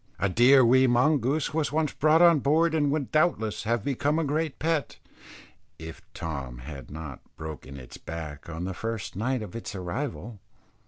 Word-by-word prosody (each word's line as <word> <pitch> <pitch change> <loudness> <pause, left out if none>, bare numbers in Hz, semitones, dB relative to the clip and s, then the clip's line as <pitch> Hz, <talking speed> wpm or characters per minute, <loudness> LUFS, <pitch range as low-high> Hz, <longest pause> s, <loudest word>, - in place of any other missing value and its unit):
A 100 - 0
dear 125 +6 +6
wee 130 +2 +5
mongoose 135 +4 +2
was 155 -2 0
once 155 -1 0
brought 155 +3 +4
on 170 -3 +6
board, 160 +4 +2
and 150 -3 +2
would 140 -2 -2
doubtless 155 -10 +1
have 115 -1 0
become 145 +3 0
a 165 - +1
great 155 +1 -1
pet, 160 -2 -1 0.8
if 80 0 -9
Tom 70 -7 -5
had 70 0 -9
not 75 -3 -8 0.2
broken 75 -3 -8
its 60 -2 -11
back 80 -2 -8
on 85 +1 -5
the 95 +1 -3
first 115 +1 -5
night 125 +4 -1
of 100 -1 -9
its 115 -3 -6
arrival. 105 +3 -5
120 Hz, 170 wpm, -27 LUFS, -, 0.8 s, dear